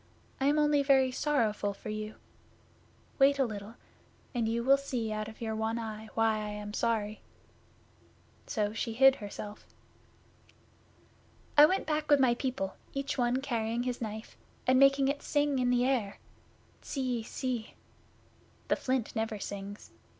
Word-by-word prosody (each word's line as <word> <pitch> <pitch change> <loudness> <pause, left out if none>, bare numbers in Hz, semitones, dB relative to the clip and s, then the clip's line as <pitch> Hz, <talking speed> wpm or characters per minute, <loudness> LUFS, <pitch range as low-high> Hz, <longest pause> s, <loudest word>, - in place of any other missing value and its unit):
I 270 - 0
am 295 +1 +3
only 295 -1 +4
very 270 -2 +4
sorrowful 220 -8 0
for - - -8
you. 215 0 -4 1.0
Wait 275 +1 +5
a 270 - +3
little, 210 0 -7 0.6
and 235 -3 0
you 235 +1 -1
will 270 +2 +6
see 250 -5 -3
out 215 0 -3
of 220 +1 -12
your 220 -1 -2
one 220 +1 -1
eye 220 -1 -6
why 225 -1 +3
I 210 0 -4
am 210 0 -6
sorry." 215 -2 -1 1.3
So 210 -2 -1
she 225 0 -3
hid 270 +3 +6
herself. 205 0 -8 1.9
'I 295 0 +10
went 380 +4 0
back 305 -1 -1
with 290 -1 +6
my 255 -3 +5
people, 240 -6 -3 0.2
each 275 0 -3
one 245 +2 +2
carrying 235 -2 -1
his 250 -1 -3
Knife, 220 0 -6 0.3
and 255 0 +4
making 275 0 +5
it 285 +1 -1
sing 290 -2 +1
in 250 -1 +2
the 245 0 +3
air 245 -7 0 0.6
tssee 255 -4 -2
sssse. 245 -1 -4 1.0
The - - +4
Flint 255 -3 -2
never 220 -1 -1
sings. 200 0 -7
240 Hz, 150 wpm, -31 LUFS, 215-270 Hz, 1.9 s, I